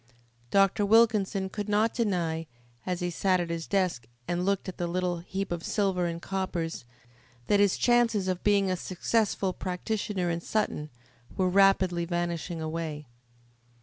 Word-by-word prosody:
Dr. 195 +3 +3
Wilkinson 205 -3 +3
could 205 +2 -5
not 215 +2 +2
deny, 170 -8 -1 0.4
as 180 -1 -2
he 175 0 -1
sat 185 +2 +2
at 170 -1 -2
his 165 -1 -4
desk 180 - 0 0.2
and 175 0 -1
looked 200 +1 0
at 185 - -6
the 175 - -1
little 180 0 -1
heap 190 +3 -4
of 170 -1 -3
silver 190 -4 0
and 170 0 -4
coppers, 175 -6 -3 0.6
that 205 - +3
his 200 -2 +3
chances 230 -5 +3
of 185 -1 -2
being 200 -2 +3
a - - +1
successful 195 +2 0
practitioner 185 0 -2
in 170 0 -2
Sutton 170 -7 -2 0.5
were 185 -2 +2
rapidly 185 -2 +3
vanishing 175 0 -2
away. 155 -1 -4
185 Hz, 150 wpm, -28 LUFS, 170-200 Hz, 0.6 s, Dr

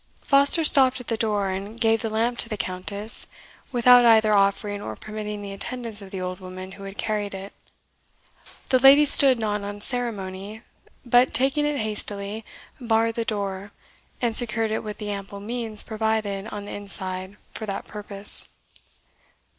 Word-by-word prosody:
Foster 280 +3 +4
stopped 265 -4 +4
at 250 - -9
the 230 - +1
door, 210 -3 -1
and 200 +4 -6
gave 225 -1 +2
the 225 - -2
lamp 230 +2 -1
to 230 - +1
the 215 - -4
Countess, 200 +4 -2 0.4
without 245 0 +6
either 220 -2 +5
offering 200 +1 +1
or 110 - -6
permitting 210 - -6
the 200 - -7
attendance 230 +1 -6
of 195 - -10
the 190 - -6
old 185 0 -5
woman 185 0 -9
who 195 0 -11
had 195 0 -9
carried 210 -2 -2
it. 195 +1 -9 1.2
The 255 - +4
lady 275 +3 +7
stood 270 -2 +7
not 210 -2 -2
on 205 0 -6
ceremony, 210 -3 -3 0.4
but 245 +2 +3
taking 275 +3 +3
it 295 -1 -1
hastily, 210 -1 -4 0.4
barred 230 -2 +1
the 230 - -2
door, 200 -2 -4 0.5
and 235 -2 -1
secured 225 -2 +3
it 220 - -2
with 210 -1 -6
the 210 -1 -5
ample 200 0 -7
means 225 0 -1
provided 220 -2 -2
on 205 -2 -7
the - - -8
inside 190 -1 -5 0.2
for 220 - -6
that 195 - -4
purpose. 205 -1 -1
215 Hz, 165 wpm, -24 LUFS, 200-230 Hz, 1.2 s, lady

